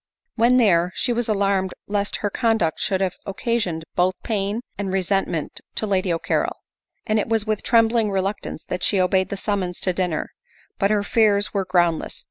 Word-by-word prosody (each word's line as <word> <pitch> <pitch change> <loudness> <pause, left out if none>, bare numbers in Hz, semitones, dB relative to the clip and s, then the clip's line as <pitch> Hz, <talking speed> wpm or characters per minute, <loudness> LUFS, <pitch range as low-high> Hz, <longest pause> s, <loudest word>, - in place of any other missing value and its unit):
When 240 +2 +4
there, 180 -7 +4
she 245 - 0
was 235 -1 -1
alarmed 195 -2 +1
lest 205 0 -1
her 205 - 0
conduct 225 -10 +1
should 190 -2 0
have 185 -1 -1
occasioned 195 -5 -2
both 185 +1 +2
pain' 210 0 -1
and 200 -2 -3
resentment 190 -4 -1
to - - -1
Lady 190 -3 +1
O'Carrol; 165 - 0 0.5
and 215 0 +1
it 210 - -2
was 225 -2 +1
with 215 -1 -1
trembling 230 -1 +3
reluctance 195 -3 -3
that 180 - -4
she 195 - +2
obeyed 185 +1 +2
the 200 - -4
summons 190 -3 -2
to 185 - +1
dinner; 175 -4 -2 0.5
but 200 - +3
her 210 -1 +2
fears 205 -1 +2
were 195 -2 0
groundless. 175 -3 +1
200 Hz, 175 wpm, -22 LUFS, 185-215 Hz, 0.5 s, When